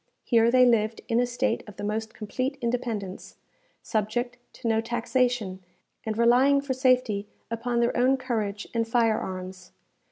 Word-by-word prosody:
Here 230 Hz, -1 st, +4 dB
they 255 Hz, +1 st, +6 dB
lived 225 Hz, -2 st, +2 dB
in 230 Hz, -, +2 dB
a 245 Hz, -, +2 dB
state 245 Hz, 0 st, -1 dB
of 205 Hz, -, -12 dB
the -, -, -7 dB
most 220 Hz, +2 st, -2 dB
complete 255 Hz, +6 st, -3 dB
independence, 235 Hz, -6 st, -3 dB, 0.5 s
subject 240 Hz, +3 st, -2 dB, 0.2 s
to 240 Hz, -, -6 dB
no 225 Hz, 0 st, +2 dB
taxation, 235 Hz, -4 st, -1 dB, 0.4 s
and 215 Hz, 0 st, -2 dB
relying 250 Hz, +4 st, +5 dB
for 280 Hz, -1 st, -2 dB
safety 255 Hz, -5 st, +2 dB, 0.2 s
upon 235 Hz, +1 st, -1 dB
their 235 Hz, -, +1 dB
own 260 Hz, +2 st, +3 dB
courage 215 Hz, -5 st, -3 dB
and 230 Hz, -1 st, 0 dB
fire 230 Hz, -2 st, +2 dB
arms. 185 Hz, 0 st, -7 dB
235 Hz, 155 wpm, -26 LUFS, 215-250 Hz, 0.5 s, they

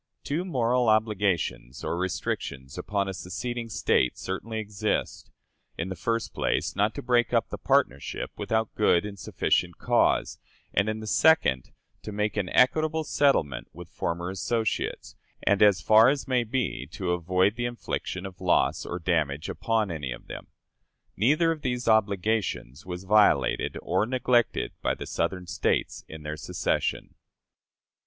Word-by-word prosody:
Two 155 Hz, +5 st, -1 dB
moral 125 Hz, -7 st, +1 dB
obligations 100 Hz, -, 0 dB
or -, -, -1 dB
restrictions 75 Hz, -6 st, -3 dB
upon 100 Hz, -1 st, -2 dB
a 95 Hz, -, -3 dB
seceding 115 Hz, +7 st, -5 dB
State 100 Hz, -, +1 dB
certainly 110 Hz, +4 st, -4 dB
exist: 105 Hz, -1 st, -2 dB, 0.5 s
in 85 Hz, +3 st, -3 dB
the 95 Hz, -, -4 dB
first 115 Hz, +5 st, -2 dB
place, -, -, -1 dB
not 105 Hz, +3 st, +1 dB
to -, -, -5 dB
break 120 Hz, -1 st, +2 dB
up 115 Hz, -, +1 dB
the -, -, -5 dB
partnership 70 Hz, +2 st, 0 dB
without 110 Hz, -1 st, -1 dB
good 105 Hz, -3 st, +3 dB
and 100 Hz, -2 st, -7 dB
sufficient 90 Hz, 0 st, 0 dB
cause; -, -, +1 dB, 0.3 s
and, 100 Hz, +3 st, +2 dB
in 110 Hz, 0 st, -3 dB
the -, -, -6 dB
second, 105 Hz, -, +3 dB, 0.3 s
to -, -, -7 dB
make 105 Hz, +1 st, -1 dB
an 100 Hz, -4 st, -1 dB
equitable 155 Hz, -, +3 dB
settlement 140 Hz, -, +1 dB
with 85 Hz, +1 st, -11 dB
former 85 Hz, +1 st, -3 dB
associates, 110 Hz, +4 st, -2 dB, 0.3 s
and, 100 Hz, -, +2 dB
as 100 Hz, -7 st, +5 dB
far 110 Hz, -, +6 dB
as 140 Hz, 0 st, -1 dB
may 125 Hz, -2 st, +2 dB
be, 115 Hz, -, -2 dB
to 90 Hz, +3 st, -3 dB
avoid 90 Hz, +4 st, +1 dB
the 120 Hz, -, -2 dB
infliction 120 Hz, -5 st, -4 dB
of 95 Hz, -1 st, -9 dB
loss 90 Hz, -1 st, +2 dB
or 85 Hz, -, -3 dB
damage 80 Hz, -3 st, -1 dB
upon 110 Hz, -4 st, 0 dB
any 75 Hz, -6 st, -4 dB
of -, -, -8 dB
them. -, -, -9 dB, 0.7 s
Neither 150 Hz, -, +3 dB
of 160 Hz, -2 st, -4 dB
these 125 Hz, -2 st, -2 dB
obligations 100 Hz, -, 0 dB
was 90 Hz, 0 st, -5 dB
violated 105 Hz, +2 st, +3 dB
or 95 Hz, +4 st, +1 dB
neglected 125 Hz, -2 st, +1 dB
by -, -, 0 dB
the -, -, -7 dB
Southern 90 Hz, +2 st, -2 dB
States -, -, -1 dB
in 80 Hz, -1 st, -10 dB
their 75 Hz, +1 st, -5 dB
secession. -, -, -2 dB
105 Hz, 150 wpm, -27 LUFS, 90-115 Hz, 0.7 s, far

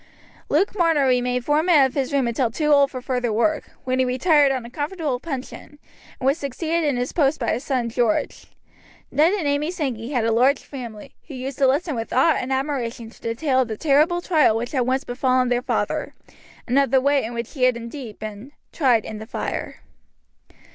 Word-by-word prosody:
Luke 360 Hz, +8 st, +1 dB
Marner 330 Hz, -7 st, +3 dB
remained 250 Hz, -1 st, +1 dB
foreman 300 Hz, -1 st, +4 dB
of 260 Hz, -, -3 dB
his 270 Hz, -3 st, -1 dB
room 275 Hz, -3 st, +1 dB
until 235 Hz, +1 st, 0 dB
too 300 Hz, +6 st, -1 dB
old 280 Hz, -1 st, +5 dB
for 255 Hz, -2 st, -7 dB
further 250 Hz, -3 st, -1 dB
work, 285 Hz, +8 st, 0 dB
when 255 Hz, 0 st, -1 dB
he -, -, +4 dB
retired 280 Hz, +3 st, +3 dB
on 255 Hz, -3 st, -3 dB
a -, -, -8 dB
comfortable 295 Hz, -2 st, -3 dB
pension, 280 Hz, 0 st, -7 dB, 0.4 s
and 260 Hz, -, -5 dB
was 275 Hz, +4 st, +2 dB
succeeded 320 Hz, +4 st, -2 dB
in 285 Hz, -4 st, +1 dB
his 245 Hz, +1 st, -2 dB
post 300 Hz, -3 st, +2 dB
by 235 Hz, -, 0 dB
his 250 Hz, -, -2 dB
son 255 Hz, -4 st, -1 dB
George. 230 Hz, -1 st, -1 dB, 0.6 s
Ned 315 Hz, +4 st, +4 dB
and 365 Hz, -8 st, -1 dB
Amy 285 Hz, +2 st, 0 dB
Sankey 265 Hz, -10 st, -3 dB
had 245 Hz, -6 st, 0 dB
a 230 Hz, -, +2 dB
large 255 Hz, +5 st, +4 dB
family, 235 Hz, -6 st, -9 dB
who 290 Hz, -, -8 dB
used 260 Hz, +1 st, -6 dB
to 270 Hz, -, +4 dB
listen 300 Hz, +5 st, +1 dB
with 230 Hz, -2 st, -4 dB
awe 270 Hz, +6 st, +4 dB
and 255 Hz, -1 st, -3 dB
admiration 260 Hz, -4 st, -2 dB
to -, -, -20 dB
the 230 Hz, 0 st, -3 dB
tale 265 Hz, 0 st, +1 dB
of 255 Hz, -, +2 dB
the 220 Hz, -2 st, -5 dB
terrible 310 Hz, -, +3 dB
trial 310 Hz, -11 st, +3 dB
which 240 Hz, +2 st, -4 dB
had 255 Hz, -4 st, 0 dB
once 260 Hz, +2 st, 0 dB
befallen 255 Hz, 0 st, +1 dB
their 245 Hz, 0 st, +1 dB
father, -, -, -2 dB, 0.5 s
and 255 Hz, +3 st, +3 dB
of 275 Hz, -, +2 dB
the 265 Hz, +1 st, +4 dB
way 280 Hz, +1 st, +2 dB
in 235 Hz, +2 st, -5 dB
which 235 Hz, 0 st, -5 dB
he 260 Hz, -5 st, +1 dB
had 250 Hz, -2 st, +2 dB
indeed 235 Hz, -1 st, -8 dB
been 215 Hz, +6 st, -8 dB, 0.2 s
"tried 250 Hz, -8 st, +2 dB
in 215 Hz, -, -6 dB
the 220 Hz, -, -9 dB
fire." -, -, -5 dB
265 Hz, 210 wpm, -22 LUFS, 245-295 Hz, 0.6 s, old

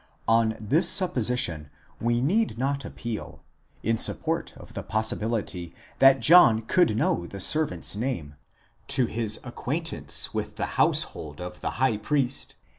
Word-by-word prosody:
On 115 Hz, -1 st, +2 dB
this 150 Hz, -, +3 dB
supposition, 120 Hz, -, +1 dB, 0.3 s
we 120 Hz, +1 st, 0 dB
need 180 Hz, -, 0 dB
not 140 Hz, +2 st, -2 dB
appeal, 115 Hz, -3 st, -7 dB, 0.4 s
in 115 Hz, +1 st, 0 dB
sup -, -, +4 dB
port -, -, -2 dB
of -, -, -14 dB
the -, -, -5 dB
possibility 110 Hz, -5 st, -2 dB, 0.2 s
that 135 Hz, 0 st, +6 dB
John 135 Hz, -10 st, +6 dB
could 160 Hz, -2 st, +2 dB
know 85 Hz, -6 st, 0 dB
the 100 Hz, -, -8 dB
servant's 100 Hz, -, +1 dB
name, 105 Hz, -, -4 dB, 0.5 s
to 130 Hz, -, +2 dB
his 110 Hz, -1 st, -2 dB
ac 120 Hz, -, -7 dB
quaintance 160 Hz, +6 st, -1 dB
with -, -, -4 dB
the -, -, -2 dB
household 75 Hz, -1 st, -1 dB
of 90 Hz, 0 st, -8 dB
the -, -, -2 dB
high 130 Hz, -4 st, +1 dB
priest 135 Hz, +3 st, -2 dB
115 Hz, 145 wpm, -25 LUFS, 105-135 Hz, 0.5 s, that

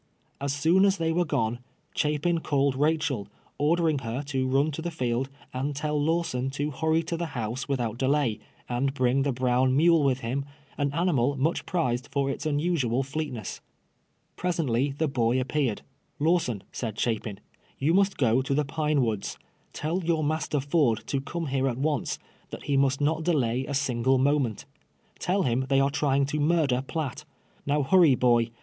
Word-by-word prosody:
As 140 Hz, 0 st, -1 dB
soon 160 Hz, +7 st, +3 dB
as 200 Hz, 0 st, +3 dB
they 165 Hz, -1 st, 0 dB
were 175 Hz, +2 st, +1 dB
gone, 115 Hz, -5 st, -1 dB, 0.3 s
Chapin 150 Hz, +3 st, +1 dB
called 140 Hz, -3 st, +1 dB
Haehel, 150 Hz, -6 st, 0 dB, 0.3 s
ordering 160 Hz, 0 st, +2 dB
her 125 Hz, +2 st, -4 dB
to 135 Hz, -2 st, -1 dB
run 140 Hz, +4 st, +2 dB
to 155 Hz, -, -5 dB
the 175 Hz, -, -2 dB
field, 130 Hz, -4 st, -1 dB, 0.2 s
and 135 Hz, +3 st, -2 dB
tell 150 Hz, +1 st, -1 dB
Lawson 150 Hz, -5 st, 0 dB
to 145 Hz, +1 st, -1 dB
hurry 160 Hz, +3 st, +1 dB
to 170 Hz, -, -3 dB
the 170 Hz, 0 st, -3 dB
house 120 Hz, +3 st, -3 dB
with 135 Hz, -2 st, 0 dB
out 115 Hz, -1 st, -3 dB
delay, 135 Hz, -5 st, +1 dB, 0.3 s
and 135 Hz, +3 st, -1 dB
bring 130 Hz, 0 st, +2 dB
the 140 Hz, 0 st, +1 dB
brown 130 Hz, +1 st, +2 dB
mule 165 Hz, 0 st, +5 dB
Avith 135 Hz, -1 st, +1 dB
him, 130 Hz, +4 st, -2 dB, 0.3 s
an 145 Hz, -1 st, 0 dB
animal 145 Hz, -5 st, +1 dB
much 155 Hz, +6 st, 0 dB
prized 125 Hz, -8 st, -1 dB
for 140 Hz, -1 st, 0 dB
its 145 Hz, -, -4 dB
unusual 145 Hz, -5 st, +1 dB
flcctness. 135 Hz, -4 st, -4 dB, 0.8 s
Pres 180 Hz, -1 st, -1 dB
ently 135 Hz, -2 st, 0 dB
the 160 Hz, -, +1 dB
boy 125 Hz, -2 st, +1 dB
appeared. 130 Hz, -3 st, -1 dB, 0.2 s
'" -, -, -43 dB
Lawson," 125 Hz, -, +1 dB
said 110 Hz, -4 st, -4 dB
Chapin, 110 Hz, -3 st, -2 dB, 0.4 s
"you 150 Hz, +5 st, +1 dB
must 195 Hz, +1 st, +3 dB
go 125 Hz, -1 st, +3 dB
to 135 Hz, +1 st, -1 dB
the 150 Hz, 0 st, +1 dB
Pine 150 Hz, -1 st, +1 dB
Woods. 110 Hz, -4 st, -2 dB, 0.3 s
Tell 170 Hz, +5 st, -2 dB
your 165 Hz, -2 st, +1 dB
master 150 Hz, -1 st, 0 dB
Ford 140 Hz, -5 st, +1 dB
to 140 Hz, -, -1 dB
come 165 Hz, +4 st, -4 dB
here 135 Hz, -1 st, 0 dB
at 120 Hz, -3 st, -1 dB
once 145 Hz, -2 st, -1 dB, 0.2 s
— -, -, -33 dB
that -, -, -8 dB
he 145 Hz, -, 0 dB
must 135 Hz, 0 st, +2 dB
not 155 Hz, +2 st, +1 dB
delay 130 Hz, -6 st, +1 dB
a 140 Hz, -, -2 dB
single 130 Hz, -1 st, +2 dB
moment. 135 Hz, -4 st, +1 dB, 0.5 s
Tell 190 Hz, +2 st, +1 dB
him 130 Hz, 0 st, 0 dB
they 135 Hz, -1 st, +4 dB
are 135 Hz, +1 st, +2 dB
trying 140 Hz, -1 st, +2 dB
to 150 Hz, +2 st, -2 dB
murder 150 Hz, -5 st, +2 dB
Piatt. 145 Hz, 0 st, -4 dB, 0.4 s
Kow 145 Hz, 0 st, +2 dB
hurry, 165 Hz, -2 st, +5 dB
boy. 120 Hz, -2 st, +3 dB
140 Hz, 180 wpm, -27 LUFS, 130-155 Hz, 0.8 s, mule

